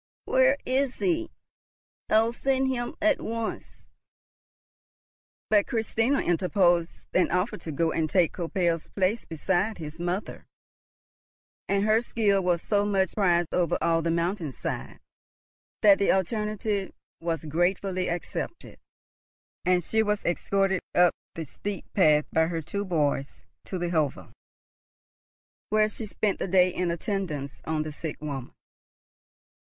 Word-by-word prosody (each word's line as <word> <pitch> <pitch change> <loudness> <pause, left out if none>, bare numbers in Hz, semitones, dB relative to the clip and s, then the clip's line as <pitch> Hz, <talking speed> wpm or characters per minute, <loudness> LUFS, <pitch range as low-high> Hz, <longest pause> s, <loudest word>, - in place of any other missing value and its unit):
"Where - - +4
is 260 0 +1
he? 335 -2 0 0.8
I'll 225 +2 +4
send 265 +1 +1
him 240 -2 -2
at 315 -2 +3
once." 230 0 -5 1.7
But 205 -2 +4
Christina 225 +4 +1
interposed 175 -1 +1
an 185 - +3
offer 180 +5 0
to 160 - -6
go 160 +3 +1
and 160 -1 0
take 175 0 +3
Koppel's 170 -2 -1
place 200 +4 0
beside 190 +6 -1
his 160 0 -8
mother, 175 +4 -3 1.2
and 200 0 +2
her 215 +1 +4
skill 210 -5 +1
was 175 -2 +1
so 205 -1 +2
much 195 -3 +1
prized 175 -5 +2
over 175 -3 +2
all 165 0 +2
the 165 - -1
mountain 170 -1 -1
side, - - -5 0.8
that 200 -2 +7
the 200 - +3
alternative 210 +1 -1 0.3
was 165 -1 -2
gratefully 180 +4 0
accepted, 175 - -5 0.9
and 180 -1 +3
she 220 +6 +2
was 210 -1 -1
escorted 190 +2 +1
up 175 0 +5 0.2
the 165 - -4
steep 200 +7 -6
path 150 -6 +4
by 160 0 +3
her 165 -1 -3
two 200 +6 -3
boys 145 -6 -1 0.2
to 190 - -4
the 175 -1 -2
hovel, 155 -5 -1 1.4
where 215 0 +3
she 215 +1 -6
spent 205 -1 -1
the - - -2
day 180 -1 +4
in 180 -1 -1
attendance 170 -5 -3
on 155 -1 -1
the 155 - -5
sick 155 +1 -6
woman. 140 -4 -6
185 Hz, 135 wpm, -27 LUFS, 165-210 Hz, 1.7 s, that